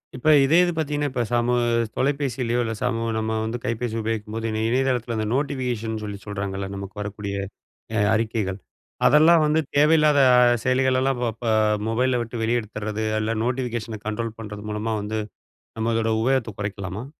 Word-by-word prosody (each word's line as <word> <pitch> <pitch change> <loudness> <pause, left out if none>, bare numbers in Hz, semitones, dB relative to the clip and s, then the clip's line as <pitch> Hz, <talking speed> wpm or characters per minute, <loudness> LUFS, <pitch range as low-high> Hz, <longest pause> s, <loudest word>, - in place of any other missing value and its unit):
இப்ப 130 +4 -4 0.2
இதே 155 +5 +4
இது 175 - +1
பார்த்தீங்கன்னா, 145 -2 -1
இப்ப 125 -2 -1
சமூ 120 0 +2 0.4
தொலைபேசிலயோ! 130 -4 0
இல்ல, 110 -1 -2
சமூ 115 -2 0
நம்ம 110 0 -1
வந்து 115 +2 -3
கைபேசி 115 -1 -2
உபயோகிக்கும்போது, 110 0 -3
இணை 110 0 -2
இணையதளத்தில 125 -2 0
அந்த 110 -1 -1
நோட்டிஃபிகேஷன் 125 -6 -2
சொல்லி 105 -1 -5
சொல்றாங்கல்ல, 100 -1 -4
நமக்கு 100 0 -7
வரக்கூடிய 100 -1 -5 0.6
அ - - +1 0.2
அறிக்கைகள். 110 -4 -1 0.5
அதெல்லாம் 160 +2 +6
வந்து 155 +1 +2 0.2
தேவையில்லாத 150 0 +5 0.4
செயலிகளெல்லாம் 130 0 +2
வ - - +1
ப 120 - -5 0.4
மொபைல்ல 125 +2 +1
விட்டு 115 0 -5
வெளிய 120 +2 +2
எடுத்துட்றது, 110 0 -5 0.2
அல்ல 110 +1 -1
நோட்டிஃபிகேஷன 120 -4 -3
கண்ட்ரோல் 115 +1 -3
பண்றது 105 -2 -7
மூலமா 110 +1 -2
வந்து, 110 +1 -3 0.6
நம்மளோட 115 0 0
உபயோகத்த 130 -2 +1
குறைக்கலாமா? 100 +1 -4
115 Hz, 145 wpm, -23 LUFS, 110-130 Hz, 0.6 s, அதெல்லாம்